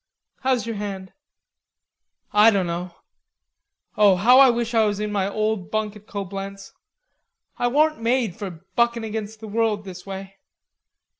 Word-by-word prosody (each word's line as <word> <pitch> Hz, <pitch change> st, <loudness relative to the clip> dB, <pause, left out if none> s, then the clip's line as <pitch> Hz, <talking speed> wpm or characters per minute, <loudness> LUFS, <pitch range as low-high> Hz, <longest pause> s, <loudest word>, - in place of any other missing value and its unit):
How's 260 Hz, -3 st, 0 dB
your 230 Hz, -2 st, -4 dB
hand?" 195 Hz, -2 st, -6 dB, 1.2 s
"I 210 Hz, +2 st, +7 dB
dunno. 180 Hz, -3 st, -2 dB, 1.0 s
Oh, 205 Hz, -3 st, +5 dB
how 240 Hz, +8 st, +6 dB
I 270 Hz, -1 st, +8 dB
wish 235 Hz, 0 st, -1 dB
I 225 Hz, -1 st, +4 dB
was 205 Hz, -1 st, -1 dB
in 210 Hz, 0 st, -2 dB
my 200 Hz, -1 st, 0 dB
old 215 Hz, -2 st, -2 dB
bunk 215 Hz, -1 st, -2 dB
at 210 Hz, 0 st, -15 dB
Coblenz. 195 Hz, 0 st, -6 dB, 0.9 s
I 245 Hz, -, +2 dB
warn't 305 Hz, +2 st, +2 dB
made 230 Hz, -5 st, +1 dB
for 185 Hz, -4 st, -8 dB
buckin' 235 Hz, -1 st, +2 dB
against 220 Hz, 0 st, -5 dB
the 220 Hz, -, -7 dB
world 215 Hz, -1 st, 0 dB
this 180 Hz, -2 st, -9 dB
way.... 195 Hz, 0 st, -8 dB
210 Hz, 145 wpm, -23 LUFS, 195-230 Hz, 1.2 s, I